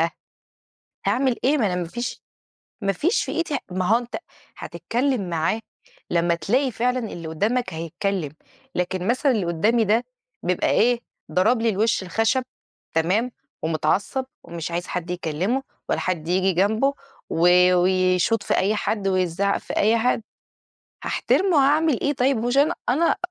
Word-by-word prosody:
ها؟ 165 +1 +2 1.0
هاعمل 260 -2 +2
إيه 285 +4 +3
ما 235 - +2
أنا 185 -3 0
ما 175 -2 -2
فيش 240 +8 -5 0.6
ما 195 - +1
فيش 340 - +1
في - - -4
إيدي 330 -3 -1
ما 185 0 -1
هو 220 +5 +4
أنت 240 0 -6 0.4
هتتكلم 230 - -2
معاه 165 +6 0 0.5
لمّا 170 0 +2
تلاقي 255 +10 +1
فعلًا 250 +2 0
اللي 170 -1 -7
قدامك 215 +10 -1
هيتكلم، 165 0 -3 0.4
لكن 180 +1 -1
مثلًا 255 +4 +2
اللي 210 -6 0
قدامي 210 +8 +2
ده 220 +4 +2 0.4
بيبقى 180 - +1
إيه 240 +1 +3 0.3
ضرب 225 +6 +3
لي 230 - +2
الوش 215 0 +1
الخشب 225 +7 +1 0.5
تمام، 190 +10 +1 0.3
ومتعصب 165 - 0 0.2
ومش 170 0 -6
عايز 175 +1 -3
حد 180 -1 -4
يكلّمه 180 - -1 0.3
ولا - - +1
حد 170 -4 -2
ييجي 185 +2 +2
جنبه 220 +10 +2 0.4
و 180 +2 +5
ويشوط 185 +4 +2
في - - 0
أي 200 +3 +2
حد 210 -1 -1
ويزعق 185 +1 +1
في - - -7
أي 220 +3 +4
حد، 230 0 +1 0.8
هاحترمه 375 -4 +1
هاعمل 290 0 +3
إيه 285 - +1
طيب 265 0 +2
مهوش 245 +4 -1
أنا 290 +2 +4
أنا 305 +7 +3
205 Hz, 150 wpm, -23 LUFS, 180-245 Hz, 1.0 s, و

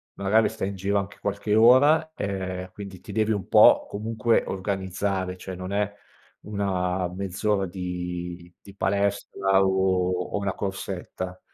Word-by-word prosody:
magari 105 +3 +3
stai 110 -3 -3
in 100 - -6
giro 100 +2 0
anche 100 0 -6
qualche 100 +1 -1
ora, 130 +8 +6
ehm, 95 -2 -4
quindi 100 -2 -9
ti - - -10
devi 110 0 +1
un 100 -4 -2
po' - - +6
comunque 110 +2 0
organizzare, 95 -1 -2
cioè, 95 0 -7
non 90 +1 -6
è 100 0 0 0.5
una 95 -3 -1
mezz'ora 100 +2 -1
di 90 -1 -5
di 100 - -14
palestra 100 -1 +1
o 95 -1 +2 0.2
o - - +1
una 100 -2 -1
corsetta. 95 -1 -5
95 Hz, 140 wpm, -25 LUFS, 95-100 Hz, 0.5 s, ora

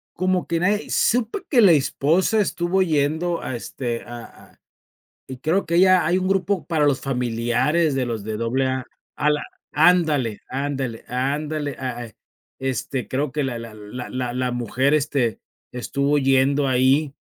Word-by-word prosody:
Como 185 0 0
que 170 -1 0
nadie 205 +4 0
supe 240 - +1
que 260 - +3
la 200 -5 +7
esposa 165 +7 +2
estuvo 190 -1 +1
yendo 160 +2 0
a, 130 - -4
este, 120 0 -4
a 120 -1 -8 0.3
a - - -29 0.7
y 130 -1 -8
creo 165 +8 0
que 170 - -1
ella 185 0 +5
hay 180 - +2
un 185 0 -1
grupo 195 -1 0
para 160 -3 +1
los 140 -2 +2
familiares 125 +5 0
de 135 -1 0
los 115 -4 -4
de 110 0 -3
AA, 130 +3 -1 0.3
a 150 +3 +2
la 150 0 0 0.3
Ándale, 150 - +3
ándale, 135 -3 -3
ándale, 145 +3 -2
ah 130 -2 -3
ah, 110 - -16 0.5
este, 130 0 -3
creo 135 +1 -2
que 150 0 -1
la 130 -3 -3
la 115 -1 -9
la 110 +4 -8
la 125 -1 -3
la 125 0 -1
mujer, 125 +4 0
este, 135 -7 0 0.3
estuvo 140 +3 0
yendo 135 +1 +2
ahí 130 +3 +3
140 Hz, 165 wpm, -22 LUFS, 125-165 Hz, 0.7 s, la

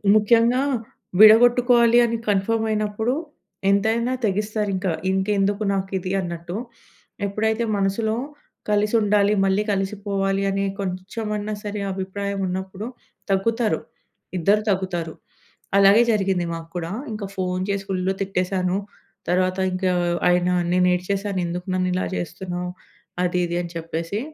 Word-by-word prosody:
ముఖ్యంగా 230 +4 +4 0.6
విడగొట్టుకోవాలి 240 +2 +7
అని 230 0 -1
కన్‌ఫామ్ 220 +3 +1
అయినప్పుడు 215 +2 0 0.6
ఎంతైనా 225 +5 +2
తెగిస్తారు. 210 +1 -1
ఇంకా 185 -1 -1 0.2
ఇంకెందుకు 200 +2 +1
నాకు 190 -1 -2
ఇది 185 +1 -4
అన్నట్టు. 170 0 -5 0.7
ఎప్పుడైతే 220 +3 0
మనసులో 200 +3 0 0.5
కలిసుండాలి, 210 -1 +3
మళ్ళీ 195 +2 +2
కలిసిపోవాలి 195 0 -1
అని 195 0 0 0.2
కొంచెమన్నా 205 +3 -3
సరే! 205 0 -4
అభిప్రాయం 195 +1 -4
ఉన్నప్పుడు 190 +3 -4 0.4
తగ్గుతారు. 220 +4 +1 0.6
ఇద్దరు 200 +5 +3
తగ్గుతారు. 180 -4 -1 0.6
అలాగే 200 +3 +7
జరిగింది 190 -4 +1
మాకు 165 0 -7
కూడా. 170 -1 -3 0.2
ఇంకా 210 -1 -5
ఫోను 185 -1 -1
చేసి 200 -1 -1
ఫుల్ 185 -1 -1 0.2
తిట్టేసాను. 185 -1 0 0.5
తర్వాత 185 +1 +1 0.2
ఇంకా 185 0 0 0.4
ఆయన 180 0 +3 0.2
నేను 180 0 +3
ఏడ్చేశాను. 195 +2 -2
ఎందుకు 180 +1 -4
నన్ను 185 0 +1
ఇలా 185 - 0
చేస్తున్నావు, 180 +1 -4 0.5
అది 180 0 0
ఇది 170 - -3
అని 175 - -7
చెప్పేసి. 165 +4 -3
195 Hz, 115 wpm, -23 LUFS, 185-210 Hz, 0.7 s, విడగొట్టుకోవాలి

